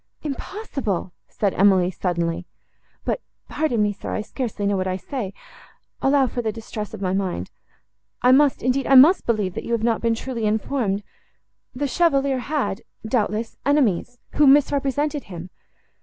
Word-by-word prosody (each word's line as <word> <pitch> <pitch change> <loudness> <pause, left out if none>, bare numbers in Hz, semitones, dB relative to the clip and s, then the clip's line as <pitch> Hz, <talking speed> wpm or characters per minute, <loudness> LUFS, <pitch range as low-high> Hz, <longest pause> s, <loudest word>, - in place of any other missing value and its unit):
"Impossible!" 275 - -4
said 200 -3 -1
Emily 190 -2 +4
suddenly; 170 -1 -2 0.6
"but—pardon 295 - -2
me, 205 0 +1
sir, - - -7
I - - -1
scarcely 220 -2 -4
know 200 0 +2
what 185 -1 -1
I 185 0 -1
say; 215 -1 -5 0.7
allow 275 0 +4
for 245 0 -3
the 220 -2 -1
distress 215 -1 -6
of - - -7
my 185 0 0
mind. 185 - -2 0.7
I 250 - +6
must, 280 +1 +4
indeed, 255 +2 +1
I 270 - +5
must 300 +9 +7
believe, 210 -6 0
that - - -5
you 235 - -3
have 230 -1 0
not 230 -1 +1
been 230 -1 +2
truly 235 -2 -4
informed. 210 -2 -1 0.7
The 285 +3 -1
Chevalier 275 -4 +2
had, 245 -7 -2 0.3
doubtless, 220 -1 -1
enemies, 245 - +1 0.2
who 295 - +6
misrepresented 285 +1 +2
him." 180 -1 -9
230 Hz, 155 wpm, -23 LUFS, 200-275 Hz, 0.7 s, must